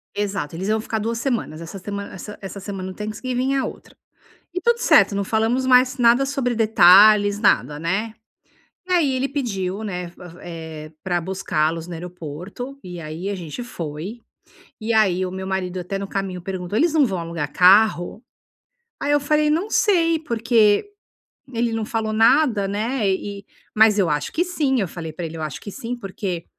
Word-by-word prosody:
Exato 195 -7 -3
eles 190 +4 -4
iam 220 0 +1
ficar 220 -1 -3
2 230 +2 -2
semanas, 230 - -2
essa 170 +4 -8
semana 200 +1 -6
essa 210 +3 -8
essa 195 +1 -7
semana 190 -1 -6
do - - -12
Thanksgiving 250 +5 -2
e - - +1
a 265 - 0
outra. - - -9 0.6
E 365 - -2
tudo 475 +1 +3
certo 210 - +4
não 200 - 0
falamos 225 +5 0
mais 255 +1 +4
nada 245 +2 +4
sobre 270 -3 -1
detalhes 205 -1 +6
nada, 150 - +2
né. 195 +7 -2 0.8
E - - -1
aí 300 -7 +3
ele 270 +2 0
pediu, 205 -8 -3
né, 180 -3 -4 0.3
eh, 160 -2 -8
pra 175 -2 0
buscá-los 165 -3 -1
no 175 - -8
aeroporto 180 - -8
e 180 -1 -8
aí 160 +4 -5
a 200 - -2
gente 180 +6 -6
foi, 175 +2 -6 0.6
e 225 +1 -1
aí 185 -4 +3
o 185 - -5
meu 190 0 -5
marido 185 -1 -2
até 180 +2 -4
no 195 0 -5
caminho 190 -3 -4
perguntou: 185 +2 -4
"Eles 325 +2 +3
não 300 -3 +5
vão 190 -6 -2
alugar 165 -3 -4
carro?" 195 +2 +4 0.8
Aí 290 +1 0
eu 290 - +4
falei: 300 +1 +2
"Não 345 +8 0
sei 335 -6 +3
porque 230 - +2 0.6
ele 235 -1 0
não 225 -1 -1
falou 220 -1 -2
nada, 225 -2 +3
né, 215 +2 -1
eh 200 +1 -2
eh, - - -22 0.3
mas 215 -1 +5
eu 180 -5 +2
acho 150 -1 -1
que 345 - +1
sim", 290 -8 0
eu 195 - -1
falei 160 -2 -7
pra 175 - -5
ele, 160 - -8
"Eu - - -5
acho 150 -4 -5
que 205 - -8
sim 240 +1 -5
porque, 195 -5 -5
205 Hz, 185 wpm, -22 LUFS, 180-240 Hz, 0.8 s, detalhes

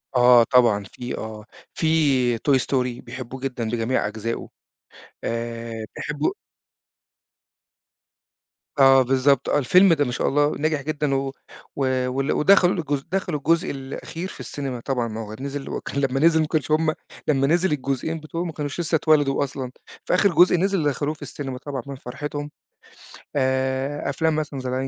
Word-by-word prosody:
آه 125 -1 +7
طبعًا 115 -4 +3
في 120 +5 -7
آه، 110 -1 -7 0.3
في - - -3 0.5
Toy 135 +3 +2
Story 125 -2 -1
بيحبوه 125 +1 -8
جدًا 130 -3 -3
بجميع 120 0 0
أجزائه. 110 +2 -4 0.7
آآ، 115 -1 -4
بيحبوا 150 - -2 2.4
آه 135 -1 +7
بالضبط، 135 +1 +2
آه - - +3
الفيلم 180 +7 +5
ده 145 -2 +2
ما 125 - -2
شاء 125 - -1
الله 145 +1 +2
ناجح 155 -1 0
جدًا، 145 -1 -1
و 135 0 -1 0.4
و 140 - -1 0.3
وال 135 +2 -1
ودخَلوا 190 +2 +5
الجزء 145 -5 -2
دخَلوا 180 -5 -1
الجزء 165 +4 +1
الأخير 150 +6 -6
في - - -11
السينما 135 -4 -5
طبعًا 125 -1 -1
ما 110 0 -5
هو 110 0 -7
نزِل 140 +1 -5
وكان 140 - -3
لمّا 135 -1 0
نزِل 160 +2 +5
ما 155 - 0
كانوش 155 -2 -1
هُم 155 0 +3 0.3
لمّا 135 -2 +2
نزِل 175 +3 +2
الجزئين 140 +3 -2
بتوعه 160 +2 -4
ما 175 - -4
كانوش 150 0 -5
لسه 170 -1 0
اتولدوا 145 -3 +3
أصلًا. 135 -2 -5 0.3
فآخر 200 +3 +3
جزء 180 +1 +6
نزِل 195 -1 +1
دخَلوه 145 +1 -1
في 155 - -19
السينما 135 -3 -6
طبعًا 140 0 -5
من 140 - -6
فرحتهم. 145 +3 -6 0.8
آآ، 130 +1 0
أفلام 160 -1 +1
مثلًا 150 -3 -3
زَي 130 -1 -4
The - - -2
140 Hz, 160 wpm, -23 LUFS, 125-155 Hz, 2.4 s, آه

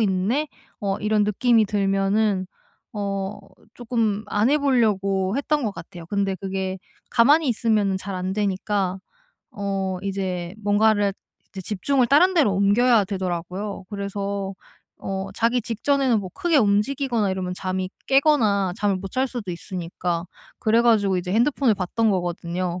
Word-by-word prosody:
있네.' 215 +9 +1 0.3
어 195 -1 -1
이런 210 0 +1
느낌이 225 +2 +3
들면은 195 0 +1 0.5
어 200 -1 -3 0.4
쪼금 225 -4 -1
안 210 +4 +2
해 300 +1 +3
보려고 205 -6 +1
했던 295 -1 0
것 210 - -1
같아요. 165 0 -10
근데 195 0 -1
그게 190 0 -3 0.3
가만히 280 +5 +4
있으면은 215 -4 +1
잘 190 0 -6
안 185 +1 -3
되니까 195 -1 -1 0.5
어 195 -2 -2
이제 185 -3 -3
뭔가를 205 -1 +3 0.4
이제 190 - -7
집중을 240 +7 0
다른 360 +7 +5
데로 270 - +4
옮겨야 210 +3 +4
되더라고요. 185 +1 -4
그래서 200 -1 -4 0.4
어 195 0 -4
자기 235 +2 +1
직전에는 240 +1 +1
뭐 185 -2 -7
크게 340 -3 +1
움직이거나 225 +1 +2
이러면 185 -1 -3
잠이 185 0 -3 0.2
깨거나 230 - +3
잠을 200 -2 +1
못 195 +1 -7
잘 260 +1 +2
수도 230 -7 -5
있으니까. 175 -1 -4 0.3
그래 225 +2 +3
가지고 205 -5 +3
이제 180 +1 -4
핸드폰을 240 0 +3
봤던 210 +4 0
거거든요. 175 0 -2
200 Hz, 310 characters per minute, -23 LUFS, 190-230 Hz, 0.5 s, 다른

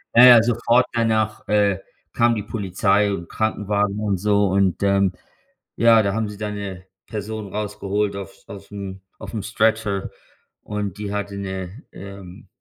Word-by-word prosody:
Ja, 120 +2 +10
ja, 120 -3 +9
sofort 120 +1 +3
danach, 110 -2 0
äh, 100 -2 +2 0.3
kam 120 0 +3
die 105 - -3
Polizei 100 0 +1
und 85 -3 -6
Krankenwagen 105 -2 0
und 100 -3 0
so 100 +1 +2
und, 95 -1 +1
ähm, 100 -1 +3 0.6
ja, 115 -1 +5
da 100 -1 0
haben 110 0 -1
sie 105 - -9
dann 105 0 -4
'ne 95 -3 -6 0.2
Person 105 -1 -5
rausgeholt 105 0 -2
auf 100 -3 -9
aufm 100 -1 -8 0.2
aufm 110 - -6
Stretcher 110 -2 0 0.5
und 105 -2 -4
die 100 -1 -4
hatte 100 -1 -3
'ne, 95 - -6
ähm, 100 -2 -11
105 Hz, 150 wpm, -22 LUFS, 100-110 Hz, 0.6 s, Ja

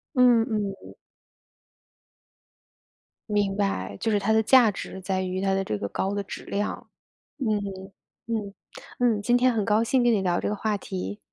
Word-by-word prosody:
嗯 245 -2 +6
嗯。 200 -2 -4 2.4
明 205 -1 +1
白， 200 -1 -1
就 225 - -1
是 205 - +3
它 205 +2 +1
的 220 0 +4
价 235 -1 +6
值 190 +1 -7
在 190 0 -1
于 185 0 -3
它 195 0 +1
的 195 - +1
这 105 - -3
个 100 - -3
高 195 - -2
的 200 - -1
质 - - -8
量。 205 +1 -3 0.5
嗯 215 -5 +1 0.7
嗯 210 -4 -3 0.5
嗯。 230 -4 +2
今 240 +3 +2
天 255 +1 +4
很 215 -3 -1
高 215 +1 +3
兴 250 +1 +2
跟 240 -1 +4
你 200 - +1
聊 175 -2 +1
这 - - -2
个 210 - -1
话 210 0 -1
题。 95 - -5
205 Hz, 185 characters per minute, -26 LUFS, 195-225 Hz, 2.4 s, 嗯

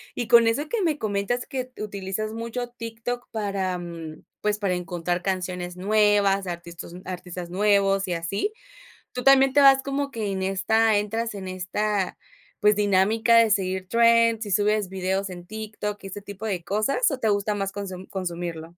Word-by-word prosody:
Y 240 - -3
con 235 -1 +7
eso 285 +7 0
que 460 -3 -1
me 320 -4 +1
comentas 215 +2 -1
que 255 -2 -5
utilizas 205 +1 -4
mucho 235 +2 -4
TikTok 235 +1 -5
para, 195 -4 -2
mm, 165 -3 -8 0.2
pues, 210 0 +1
para 195 -3 0
encontrar 175 0 -2
canciones 180 -2 -3
nuevas, 200 -1 +3
artistas 170 -1 -7
artistas 180 -1 -6
nuevos 195 0 +2
y 180 - -1
así, 195 - -2 0.6
tú 250 -1 -5
también 270 0 +6
te 290 - +5
vas 270 -1 +7
como 280 +1 -2
que 220 -4 -3
en 190 - -3
esta 210 +4 +2
entras 225 +3 -2
en 190 -2 -6
esta 185 +2 -2 0.4
pues, 210 0 +5
dinámica 210 +3 +3
de 230 -1 +5
seguir 190 -2 0
trends 230 0 +4
y - - -5
subes 210 0 +2
videos 190 +1 -2
en 175 -1 -9
TikTok 210 0 -5
y - - -6
este 200 +2 -7
tipo 205 +2 -7
de 185 -5 -2
cosas, 215 - +1
o, 270 - -3
¿te 225 - +1
gusta 205 +1 +1
más 195 -1 -2
consu-consumirlo? 185 -4 -5
205 Hz, 170 wpm, -25 LUFS, 185-225 Hz, 0.6 s, con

